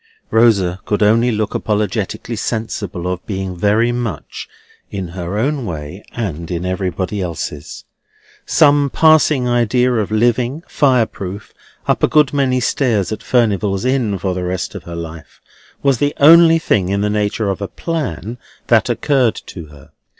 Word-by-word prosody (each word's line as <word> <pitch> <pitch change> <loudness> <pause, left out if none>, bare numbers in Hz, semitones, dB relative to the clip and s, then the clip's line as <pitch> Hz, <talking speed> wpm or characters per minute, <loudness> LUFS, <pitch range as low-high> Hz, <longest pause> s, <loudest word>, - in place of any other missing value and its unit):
Rosa 100 -6 +3
could 105 0 +1
only 115 +4 +3
look 110 -1 -2
apologetically 105 +1 -2
sensible 110 -5 -4
of 90 0 -3
being 95 -2 -4
very 105 +6 +2
much 120 -10 -5 0.4
in 95 -3 -5
her 90 +2 -5
own 135 +4 0
way 85 0 -6
and 85 -8 -4
in 90 0 -3
everybody 95 +1 -2
else's. 80 -4 -6 0.6
Some 145 -2 +4
passing 155 -5 +4
idea 120 +1 +2
of 110 -4 -1
living, 120 +7 0
fireproof, 110 -7 0 0.3
up - - +1
a - - +4
good 150 -4 +3
many 130 -3 +1
stairs 115 -6 0
in 110 - -3
Furnival's 105 -4 0
Inn 125 -6 0
for 95 0 -2
the 90 0 -3
rest 90 0 -3
of - - -9
her 85 - -7
life, 80 -2 -9 0.4
was 135 -4 +2
the 145 0 0
only 165 +2 +7
thing 100 - 0
in 100 +1 0
the 105 - 0
nature 105 0 0
of 95 - -5
a 100 - -2
plan 125 - -4 0.3
that - - +4
occurred 130 -6 +1
to 85 -4 -9
her. 75 -2 -17
105 Hz, 155 wpm, -17 LUFS, 95-125 Hz, 0.6 s, only